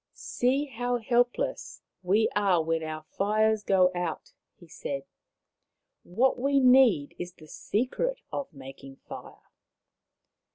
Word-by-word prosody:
" -, -, -61 dB
See 265 Hz, +4 st, 0 dB
how 245 Hz, -2 st, -2 dB
helpless 245 Hz, -, -1 dB, 0.2 s
we 200 Hz, +5 st, +2 dB
are 195 Hz, -5 st, +3 dB
when 165 Hz, 0 st, -1 dB
our 155 Hz, -1 st, -5 dB
fires 215 Hz, +5 st, +1 dB
Maui 190 Hz, -2 st, +5 dB
85 -, -, -16 dB
go 175 Hz, -, -3 dB
out," 165 Hz, -3 st, -5 dB, 0.2 s
he 175 Hz, -, -17 dB
said. 140 Hz, -3 st, -5 dB, 0.6 s
" -, -, -57 dB
What 260 Hz, +1 st, +3 dB
we 275 Hz, +2 st, +2 dB
need 250 Hz, -, +5 dB
is 175 Hz, 0 st, -6 dB
the 155 Hz, -3 st, -16 dB
secret 260 Hz, -, -2 dB, 0.2 s
of 280 Hz, -8 st, -4 dB
making 135 Hz, -1 st, -11 dB
fire. -, -, -10 dB
210 Hz, 140 wpm, -28 LUFS, 165-250 Hz, 0.6 s, Maui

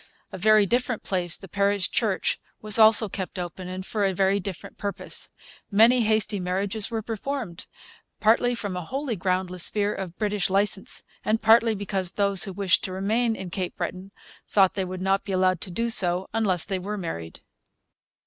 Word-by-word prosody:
A -, -, -7 dB
very 215 Hz, +1 st, +5 dB
different 245 Hz, +2 st, -1 dB
place, 180 Hz, -3 st, +1 dB
the 195 Hz, -, -11 dB
parish 200 Hz, +1 st, 0 dB
church, 210 Hz, -5 st, 0 dB, 0.2 s
was 215 Hz, +1 st, +4 dB
also 220 Hz, 0 st, +8 dB
kept 190 Hz, 0 st, -6 dB
open, 180 Hz, +1 st, -6 dB
and 185 Hz, +1 st, -6 dB
for 210 Hz, 0 st, -2 dB
a 195 Hz, -1 st, +1 dB
very 195 Hz, +2 st, +2 dB
different 190 Hz, -2 st, -8 dB
purpose. 200 Hz, -1 st, -2 dB, 0.4 s
Many 230 Hz, +4 st, +5 dB
hasty 215 Hz, -2 st, +1 dB
marriages 195 Hz, +3 st, -1 dB
were 225 Hz, -1 st, -3 dB
performed, 225 Hz, -4 st, -5 dB, 0.5 s
partly 235 Hz, +3 st, +3 dB
from 205 Hz, -5 st, -4 dB
a 180 Hz, -, -4 dB
wholly 270 Hz, -, -3 dB
groundless 185 Hz, -1 st, -1 dB
fear 205 Hz, -1 st, -1 dB
of 185 Hz, -3 st, -7 dB
British 205 Hz, -3 st, 0 dB
licence, 195 Hz, +1 st, -1 dB, 0.2 s
and 220 Hz, +1 st, +1 dB
partly 225 Hz, 0 st, +4 dB
because 195 Hz, -2 st, -3 dB
those 200 Hz, -2 st, +4 dB
who 195 Hz, -, -6 dB
wished 190 Hz, -2 st, +1 dB
to 185 Hz, -, -5 dB
remain 220 Hz, +5 st, 0 dB
in 190 Hz, -4 st, -7 dB
Cape 180 Hz, 0 st, -4 dB
Breton 185 Hz, +2 st, -5 dB, 0.4 s
thought 195 Hz, -3 st, +3 dB
they 190 Hz, -, -2 dB
would 185 Hz, 0 st, -6 dB
not 195 Hz, +1 st, +1 dB
be 195 Hz, -, -5 dB
allowed 185 Hz, -2 st, +1 dB
to 195 Hz, -, -3 dB
do 230 Hz, +7 st, -2 dB
so 185 Hz, -5 st, +1 dB
unless 195 Hz, -6 st, +1 dB
they 190 Hz, -2 st, -2 dB
were 205 Hz, +3 st, -5 dB
married. 85 Hz, -, -6 dB
200 Hz, 180 wpm, -25 LUFS, 185-215 Hz, 0.5 s, also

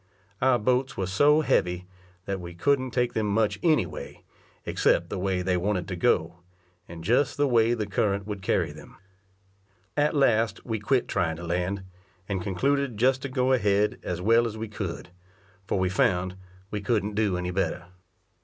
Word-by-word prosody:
Our 130 Hz, -1 st, +4 dB
boats 125 Hz, +4 st, 0 dB
were 95 Hz, -, -1 dB
so 145 Hz, +11 st, +4 dB
heavy 90 Hz, -, 0 dB, 0.4 s
that 100 Hz, -1 st, -3 dB
we 85 Hz, -1 st, -8 dB
couldn't 130 Hz, +6 st, +1 dB
take 125 Hz, -1 st, 0 dB
them 110 Hz, -1 st, 0 dB
much 105 Hz, +1 st, +1 dB
any 160 Hz, -3 st, +3 dB
way, -, -, -9 dB, 0.4 s
except -, -, +1 dB
the -, -, -3 dB
way 95 Hz, -1 st, -1 dB
they 90 Hz, 0 st, +1 dB
wanted 90 Hz, -1 st, -1 dB
to 90 Hz, -, -3 dB
go, 85 Hz, -4 st, +1 dB, 0.5 s
and 85 Hz, -1 st, -9 dB
just 125 Hz, -, +2 dB
the 145 Hz, 0 st, +3 dB
way 120 Hz, -2 st, +3 dB
the 110 Hz, -2 st, -2 dB
current 100 Hz, -2 st, 0 dB
would 105 Hz, -2 st, -5 dB
carry -, -, 0 dB
them. -, -, -13 dB, 1.0 s
At 150 Hz, +2 st, +2 dB
last 115 Hz, -7 st, +2 dB
we 110 Hz, -3 st, -2 dB
quit 125 Hz, +4 st, +1 dB
trying 85 Hz, -4 st, 0 dB
to 85 Hz, -, -9 dB
land, 90 Hz, +3 st, -2 dB, 0.4 s
and 95 Hz, -3 st, -2 dB
concluded 135 Hz, +6 st, 0 dB
just 130 Hz, +3 st, +3 dB
to 140 Hz, -, -4 dB
go 130 Hz, 0 st, +1 dB
ahead 105 Hz, -3 st, +2 dB
as 90 Hz, -1 st, -4 dB
well 115 Hz, +3 st, +4 dB
as 110 Hz, -1 st, -6 dB
we 110 Hz, +1 st, -4 dB
could, 95 Hz, -4 st, -5 dB, 0.6 s
for -, -, 0 dB
we 95 Hz, 0 st, +1 dB
found 90 Hz, 0 st, +1 dB, 0.4 s
we 105 Hz, -, -3 dB
couldn't 105 Hz, -1 st, 0 dB
do 100 Hz, -3 st, +1 dB
any 90 Hz, 0 st, -3 dB
better. 90 Hz, -2 st, -2 dB
105 Hz, 180 wpm, -26 LUFS, 90-125 Hz, 1.0 s, Our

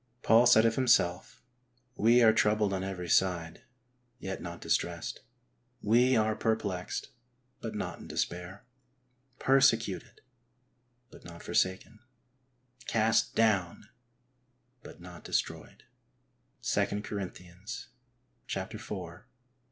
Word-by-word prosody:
Paul 115 Hz, +2 st, +6 dB
said 110 Hz, -1 st, +6 dB
of 115 Hz, -, +3 dB
himself: 105 Hz, -9 st, +1 dB, 0.3 s
" 125 Hz, 0 st, -42 dB
We 120 Hz, +3 st, +4 dB
are 110 Hz, -1 st, +6 dB
troubled 105 Hz, -2 st, +2 dB
on 95 Hz, -1 st, -2 dB
every 95 Hz, -2 st, -5 dB
side, 85 Hz, -3 st, +1 dB, 0.6 s
yet 95 Hz, -4 st, -6 dB
not 85 Hz, -1 st, -7 dB
dis -, -, +2 dB
tressed; -, -, -4 dB, 0.6 s
we 125 Hz, +4 st, +3 dB
are 110 Hz, -1 st, +2 dB
perplexed 105 Hz, -4 st, -2 dB, 0.5 s
but 115 Hz, -2 st, -6 dB
not 105 Hz, -, -4 dB
in -, -, -11 dB
despair; 90 Hz, +3 st, -4 dB, 0.7 s
persecuted 120 Hz, -7 st, +2 dB, 0.9 s
but -, -, -15 dB
not 85 Hz, -1 st, -11 dB
forsaken; 95 Hz, +4 st, -1 dB, 0.9 s
cast 110 Hz, 0 st, +1 dB
down 100 Hz, -6 st, +1 dB, 0.9 s
but -, -, -13 dB
not 90 Hz, -2 st, -12 dB
destroyed -, -, -3 dB, 0.4 s
" -, -, -44 dB
(2 105 Hz, +1 st, 0 dB, 1.8 s
Cor. 90 Hz, -7 st, -8 dB
105 Hz, 105 wpm, -30 LUFS, 90-115 Hz, 1.8 s, Paul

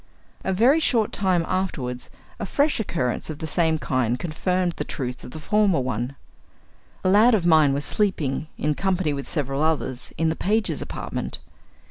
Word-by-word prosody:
A -, -, 0 dB
very 240 Hz, -, +4 dB
short 235 Hz, -8 st, +2 dB
time 185 Hz, -4 st, +1 dB
afterward 140 Hz, -10 st, -2 dB, 0.3 s
a -, -, -2 dB
fresh 290 Hz, -1 st, +1 dB
occurrence 160 Hz, -, -2 dB
of 155 Hz, -, -5 dB
the 160 Hz, -, -5 dB
same 160 Hz, +1 st, +1 dB
kind 125 Hz, -5 st, 0 dB
confirmed 175 Hz, +4 st, -1 dB
the -, -, -1 dB
truth 125 Hz, -4 st, -5 dB
of -, -, -8 dB
the 140 Hz, -, -9 dB
former 205 Hz, -1 st, +2 dB
one. 125 Hz, +1 st, -2 dB, 0.9 s
A -, -, +1 dB
lad 220 Hz, +5 st, +6 dB
of 185 Hz, -5 st, 0 dB
mine 155 Hz, -4 st, +5 dB
was 140 Hz, +1 st, -1 dB
sleeping, 160 Hz, -9 st, 0 dB
in 150 Hz, 0 st, 0 dB
company 185 Hz, -2 st, 0 dB
with 140 Hz, -1 st, -5 dB
several 140 Hz, -2 st, -1 dB
others, 150 Hz, -5 st, -1 dB
in 165 Hz, 0 st, +2 dB
the 160 Hz, -, -1 dB
pages' 215 Hz, +5 st, 0 dB
apartment. -, -, -4 dB
160 Hz, 170 wpm, -24 LUFS, 140-190 Hz, 0.9 s, lad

